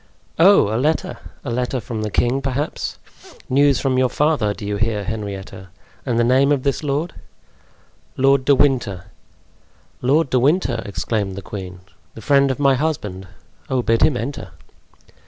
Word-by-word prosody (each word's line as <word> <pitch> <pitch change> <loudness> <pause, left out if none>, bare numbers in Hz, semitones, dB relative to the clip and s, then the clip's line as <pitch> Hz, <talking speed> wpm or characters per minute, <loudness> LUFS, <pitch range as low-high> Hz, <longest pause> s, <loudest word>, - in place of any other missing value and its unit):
"Oh, 170 - +5
a - - 0
letter! 155 +3 -1 0.3
a 125 - -3
letter 125 +2 -1
from 110 -1 -5
the 110 - -2
king, 125 +6 +1
perhaps. 135 +3 -3 0.5
News 140 0 +3
from 130 -2 +1
your 130 -1 +2
father, 145 -9 +1
do 105 - -7
you 100 0 -2
hear, 110 -1 -1
Henrietta? 100 -3 -6 0.4
And 120 -2 0
the 120 - +3
name 130 +4 +3
of 140 -3 +1
this 140 -2 0
lord?" 150 +3 -2 1.0
"Lord 135 0 +3
de 140 +1 +4
Winter." 125 -10 +1 1.0
"Lord 140 +3 +2
de 130 - +3
Winter!" 135 -3 +1
exclaimed 100 -1 -2
the 100 - -7
queen, 95 -2 -8 0.3
"the 110 - -9
friend 140 +1 +3
of 130 - -1
my 140 -1 +3
husband. 105 -10 -3 0.4
Oh, 130 -2 0
bid 115 0 +1
him 150 -4 +4
enter!" 115 - -6
125 Hz, 160 wpm, -20 LUFS, 105-140 Hz, 1.0 s, Oh